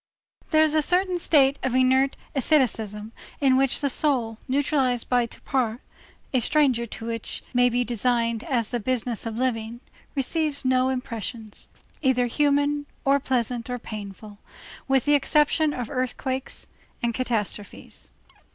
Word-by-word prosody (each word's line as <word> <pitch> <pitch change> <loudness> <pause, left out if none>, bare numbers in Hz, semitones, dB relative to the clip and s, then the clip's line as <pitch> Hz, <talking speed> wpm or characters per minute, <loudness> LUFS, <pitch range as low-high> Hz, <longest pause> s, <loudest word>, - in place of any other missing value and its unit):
There 315 -2 +5
is 310 -1 +2
a 310 - +4
certain 360 +3 +1
state 280 -4 +4
of 255 -1 -1
inert 260 +1 +3 0.2
asceticism 225 -7 +1 0.3
in 270 -2 +4
which 270 +1 +2
the 280 - +1
soul, 245 -8 0
neutralized 265 -3 +1
by 245 -2 +2
torpor, 235 -1 -2 0.6
a 255 - +4
stranger 255 -2 +2
to 225 - -7
that 230 - -2
which 230 -1 -4
may 245 0 +4
be 245 +1 +1
designated 235 -1 0
as 235 -5 0
the 240 - -1
business 235 -1 -2
of 225 0 -5
living, 235 -2 -2 0.4
receives 290 +1 -1
no 255 0 +3
impressions, 230 -3 -5 0.3
either 260 -3 +3
human, 290 +2 +1 0.2
or 275 +1 +4
pleasant 245 -2 -1
or 250 - -2
painful, 205 -2 -9 0.5
with 270 -2 +2
the 290 - +4
exception 300 +2 +3
of 250 -5 -4
earthquakes 260 0 -2 0.4
and 235 0 +1
catastrophes. 220 -5 -4
255 Hz, 140 wpm, -25 LUFS, 230-280 Hz, 0.6 s, There